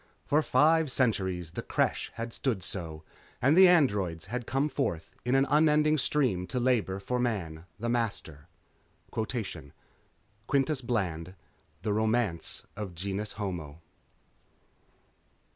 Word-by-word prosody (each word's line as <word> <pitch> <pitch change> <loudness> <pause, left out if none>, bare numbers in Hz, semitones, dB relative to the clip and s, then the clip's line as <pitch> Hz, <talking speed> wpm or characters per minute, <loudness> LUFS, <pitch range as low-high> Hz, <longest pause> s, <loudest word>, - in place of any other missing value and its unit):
For 150 +2 +3
five 160 0 +4
centuries 95 -10 0
the - - -4
Creche - - 0
had 115 0 -5
stood 115 -9 -1
so, 80 -5 -5 0.4
and 140 +5 +4
the 190 +1 +9
Androids 100 - +2
had 120 +4 -4
come 135 +3 +1
forth 85 - -3
in 125 +2 +1
an 135 0 +4
unending 150 +1 +4
stream 125 -11 0
to 125 - -2
labor 120 -6 +1
for 125 +6 -2
Man, 85 -10 -2
the 115 - -2
Master...._ 105 -11 -2 0.7
_Quintus 120 +3 -4
Bland, 90 -7 -2 0.5
The 105 -2 0
Romance 110 -5 0
of 100 -4 -6
Genus 100 +4 -3
Homo. 85 -7 -5
110 Hz, 120 wpm, -29 LUFS, 95-130 Hz, 0.7 s, the